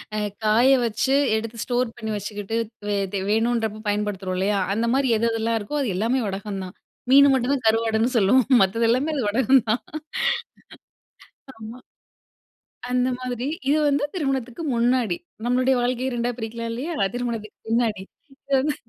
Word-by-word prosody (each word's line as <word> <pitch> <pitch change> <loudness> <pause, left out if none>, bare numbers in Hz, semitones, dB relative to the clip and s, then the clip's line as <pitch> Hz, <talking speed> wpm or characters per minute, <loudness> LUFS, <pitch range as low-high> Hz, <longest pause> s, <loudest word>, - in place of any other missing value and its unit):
அ - - -1 0.3
காய 230 +5 +4 0.2
வச்சு 250 +4 0 0.2
எடுத்து 225 +1 -4
ஸ்டோர் 245 -2 -1
பண்ணி 220 0 -4
வச்சுக்கிட்டு, 205 +2 -4 0.2
த்வே 205 0 -1 0.2
தே 195 - -1
வேணுன்றப்போ 225 -1 0
பயன்படுத்துறோம் 205 -3 -2
இல்லையா? 200 +1 +1 0.2
அந்த 230 +2 0
மாரி 270 -2 +2
எது 230 +2 +1
எதெல்லாம் 225 0 0
இருக்கோ 290 +9 -3
அது 225 -9 -1
எல்லாமே 240 +5 +1
வடகம் 195 0 -4
தான். 185 - -11 0.4
மீனு 280 +1 +8
மட்டும் 260 +1 +1
தான் 250 - -6
கருவாடுன்னு 225 +2 +2
சொல்லுவோம். 225 +4 +4 0.2
மத்தது 230 +5 +1
எல்லாமே 270 +7 +1
அது 270 - -1
வடகம் 260 +3 +3
தான். 230 - +1 1.8
ஆமா. 225 +3 -9 1.1
அந்த 250 0 +2
மாதிரி, 250 -1 -4 0.2
இது 300 - +4
வந்து 285 0 +1
திருமணத்துக்கு 270 -3 -2
முன்னாடி. 235 -5 +2 0.3
நம்மளுடைய 255 +2 +2
வாழ்க்கைய 250 +1 -1
2ஆ 240 +1 -1
பிரிக்கலாம் 230 0 -5
இல்லையா? 290 +9 -4 0.2
திருமணத்துக்கு 230 -4 -4
பின்னாடி. 225 -4 0 0.3
இது 275 +1 -8
வந்து 295 +2 0
230 Hz, 150 wpm, -23 LUFS, 215-255 Hz, 1.8 s, மீனு